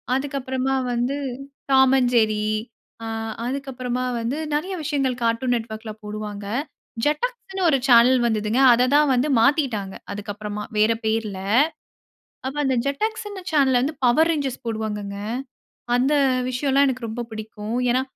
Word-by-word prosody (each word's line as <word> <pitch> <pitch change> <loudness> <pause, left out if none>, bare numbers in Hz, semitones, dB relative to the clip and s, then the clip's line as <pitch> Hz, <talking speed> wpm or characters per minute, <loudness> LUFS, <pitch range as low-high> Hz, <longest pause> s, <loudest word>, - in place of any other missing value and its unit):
அதற்கு 275 +1 -2
அப்புறமா 260 +1 -1 0.2
வந்து 245 +4 0 0.5
"டாம் 265 0 +6
அண்ட் 245 -1 +1
ஜெர்ரி." 215 -2 +2 0.6
ஆ - - -4 0.4
அதுக்கு 275 +2 -3
அப்புறமா 250 0 -2 0.2
வந்து 245 +6 -2 0.2
நிறைய 365 +6 -2
விஷயங்கள் 275 -4 0
கார்ட்டூன் 230 +2 +1
நெட்வொர்க்ல 220 -1 -5
போடுவாங்க. 210 -1 -6 0.6
ஜெட்டாக்ஸ்ன்னு 385 +4 -1
ஒரு 275 - +4
சேனல் 250 +1 +6
வந்தது. 215 -2 0 0.2
அதை 245 +2 +3
தான் 300 0 +5
வந்து 255 +3 +2
மாற்றிட்டாங்க. 230 -7 +1 0.2
அதுக்கு 205 +1 -5
அப்புறமா 210 0 -5
வேற 215 +2 +4
பெயர்ல. 220 -3 -1 1.1
அப்போ 270 +2 -4
அந்த 265 -1 +2
ஜெட்டாக்ஸ்னு 415 +6 -3
சேனல்ல 270 -5 +3
வந்து 295 +4 -1
'பவர் 255 +7 +4
ரேஞ்சர்ஸ்' 275 -5 -3
போடுவாங்கங்க. 210 -3 -3 0.8
அந்த 260 +4 +2 0.4
விஷயம்லாம் 275 +2 +2
எனக்கு 250 -2 -3
ரொம்ப 240 +2 -4
பிடிக்கும். 215 0 -6 0.2
ஏன்னா 255 +2 +2
250 Hz, 135 wpm, -23 LUFS, 220-275 Hz, 1.1 s, டாம்